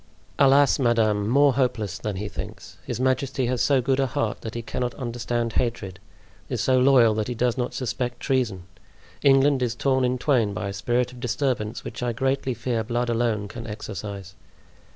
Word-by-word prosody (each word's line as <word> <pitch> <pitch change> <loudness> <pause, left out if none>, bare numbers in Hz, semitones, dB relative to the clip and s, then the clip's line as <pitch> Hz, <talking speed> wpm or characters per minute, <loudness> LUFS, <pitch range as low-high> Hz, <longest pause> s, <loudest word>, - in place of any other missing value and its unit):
"Alas! 140 +1 +5
madame, 110 -5 +2
more 140 +2 +5
hopeless 110 -7 -1
than 105 -2 -3
he 105 +3 -4
thinks. - - -8
His - - -3
majesty 130 +1 0
has 125 0 -1
so 135 -3 +3
good 135 +2 +1
a 135 - +2
heart 115 -2 -2
that 110 0 -7
he 115 - -4
cannot 125 +1 -3
understand 120 -2 -3
hatred; 100 -6 -2 0.5
is - - -2
so 130 -1 +3
loyal 125 -4 +5
that 105 -1 -2
he 125 - -3
does 120 0 +1
not 125 -1 -3
suspect 125 -1 -3
treason! 120 -9 -1 0.6
England 135 0 +4
is 120 -2 0
torn 130 +1 +1
in 125 0 +1
twain 120 -7 +1
by 100 +1 -3
a - - -5
spirit 125 +3 0
of 125 - -12
disturbance 120 -2 -2
which, 115 - -7
I 120 -1 -1
greatly 130 +1 -1
fear, 115 -1 -2
blood 120 +2 -1
alone 115 -3 0
can 115 +2 -8
exorcise." 100 -3 -7
120 Hz, 185 wpm, -24 LUFS, 110-130 Hz, 0.6 s, Alas